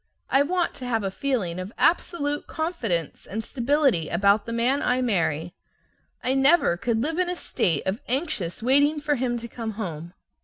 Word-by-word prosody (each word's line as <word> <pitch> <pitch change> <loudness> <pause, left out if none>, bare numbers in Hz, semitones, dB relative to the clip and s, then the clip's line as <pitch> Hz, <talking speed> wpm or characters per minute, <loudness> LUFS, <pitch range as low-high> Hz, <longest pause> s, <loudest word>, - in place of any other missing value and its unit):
I 270 - +5
want 350 +4 0
to 255 - -6
have 225 -3 0
a 195 - -2
feeling 195 -8 -2
of 185 +3 -6
absolute 295 -4 +1
confidence 230 - -3
and 220 +3 -4
stability 255 - +1
about 200 +4 +3
the - - -3
man 245 +5 +1
I 250 +1 +1
marry. 175 -8 0 0.7
I 255 - +1
never 270 - +4
could 225 +4 -1
live 325 +4 -2
in 365 -1 +1
a 360 - -1
state 165 - -1
of 190 +4 -2
anxious 225 - -2
waiting 285 +4 +4
for 295 0 0
him 245 -3 -1
to 235 0 -6
come 225 -1 -5
home. 175 -4 -6
240 Hz, 180 wpm, -25 LUFS, 195-285 Hz, 0.7 s, I